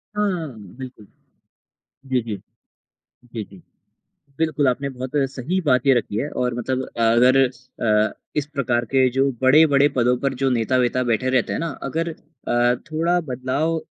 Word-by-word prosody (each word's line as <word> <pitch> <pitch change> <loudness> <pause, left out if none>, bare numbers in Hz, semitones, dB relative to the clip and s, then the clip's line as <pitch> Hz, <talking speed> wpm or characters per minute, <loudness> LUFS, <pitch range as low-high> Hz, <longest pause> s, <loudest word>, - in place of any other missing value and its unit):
हाँ, 180 -9 -1 0.2
बिल्कुल। 130 -5 -9 1.0
जी, 130 -1 +1
जी। 110 -3 -4 1.0
जी, 110 -2 -3
जी। 95 -1 -15 0.8
बिल्कुल, 155 -4 +1
आपने 140 +3 -1
बहुत 130 0 -6 0.2
सही 150 +8 -2
बात 125 -1 +3
ये 135 - +6
रखी 110 -3 -1
है 145 - -2
और 125 -1 -1
मतलब 130 +2 -2
अ, - - -4
अगर 120 +3 +5
अ, 115 -4 -1 0.2
इस 145 -1 0
प्रकार 120 -3 0
के 130 -1 +5
जो 135 +2 +1
बड़े-बड़े 145 +1 +5
पदों 125 0 +3
पर 135 -1 0
जो 135 - +3
नेता-वेता 125 +1 +1
बैठे 130 +3 +1
रहते 130 -2 +1
हैं - - -2
ना। 165 - -2
अगर 165 +5 -2 0.4
अ, 120 +1 +3 0.2
थोड़ा 170 +3 +1
बदलाव 135 +6 -1
130 Hz, 155 wpm, -22 LUFS, 120-145 Hz, 1.0 s, ये